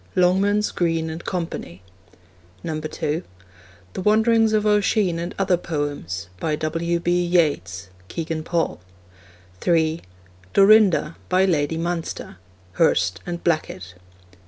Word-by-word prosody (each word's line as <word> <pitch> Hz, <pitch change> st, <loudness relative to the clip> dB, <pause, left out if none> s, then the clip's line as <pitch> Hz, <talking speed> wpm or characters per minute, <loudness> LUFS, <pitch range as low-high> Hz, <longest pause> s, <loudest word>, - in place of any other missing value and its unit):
(Longmans, 195 Hz, +3 st, +2 dB
Green 165 Hz, -2 st, 0 dB
and 160 Hz, +2 st, -7 dB
Co.) 180 Hz, -2 st, -2 dB
(2) 85 Hz, -, -8 dB, 2.1 s
The -, -, -4 dB
Wanderings 220 Hz, +2 st, +3 dB
of 215 Hz, -1 st, +1 dB
Oisin 205 Hz, -4 st, +2 dB
and 175 Hz, +1 st, -5 dB
Other 190 Hz, -2 st, +2 dB
Poems. 145 Hz, -, -4 dB
By 155 Hz, -1 st, 0 dB
W. 165 Hz, +3 st, -1 dB
B. 175 Hz, +1 st, +1 dB
Yeats. 100 Hz, -, 0 dB, 0.2 s
(Kegan 160 Hz, -, -4 dB
Paul.) 170 Hz, -, -1 dB, 0.8 s
(3) 160 Hz, -, +1 dB, 0.5 s
Dorinda. 195 Hz, -6 st, +5 dB
By 185 Hz, +1 st, +3 dB
Lady 160 Hz, -3 st, 0 dB
Munster. 165 Hz, -, -4 dB, 0.3 s
(Hurst 90 Hz, 0 st, +2 dB
and 170 Hz, -1 st, -5 dB
Blackett.) 95 Hz, -, -2 dB
170 Hz, 110 wpm, -22 LUFS, 155-185 Hz, 2.1 s, Dorinda